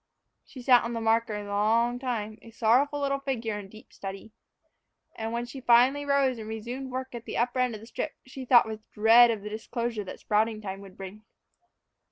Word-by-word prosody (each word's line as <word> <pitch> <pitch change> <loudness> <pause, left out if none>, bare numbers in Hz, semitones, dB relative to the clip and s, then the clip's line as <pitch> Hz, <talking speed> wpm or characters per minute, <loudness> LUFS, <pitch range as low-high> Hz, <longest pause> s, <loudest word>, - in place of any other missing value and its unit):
She 255 - -12
sat 250 -1 +6
on 235 - -3
the 230 - -2
marker 225 -1 +1
a 210 - -4
long 225 +4 +1
time, 220 -5 -4
a 230 - -13
sorrowful 250 +6 +2
little 275 0 0
figure, 230 -6 -3
in 195 -2 -10
deep 215 +2 -16
study. 195 +2 -8 0.8
And 225 0 -4
when 235 +1 -2
she 260 +2 -9
finally 255 +4 +4
rose 275 -3 +2
and 220 0 -7
resumed 240 +5 -5
work 260 0 -5
at 235 -1 -7
the - - -5
upper 245 +2 0
end 250 -3 +1
of 210 - -10
the - - -11
strip, 295 +6 -4
she 260 0 -8
thought 245 -1 +6
with 220 -1 -6
dread 230 +3 +7
of 220 -3 -2
the 210 - -5
disclosure 225 0 -3
that - - -8
sprouting 215 +1 0
time 195 -2 -6
would 195 -2 -13
bring. 195 +2 -9
230 Hz, 210 wpm, -27 LUFS, 215-250 Hz, 0.8 s, dread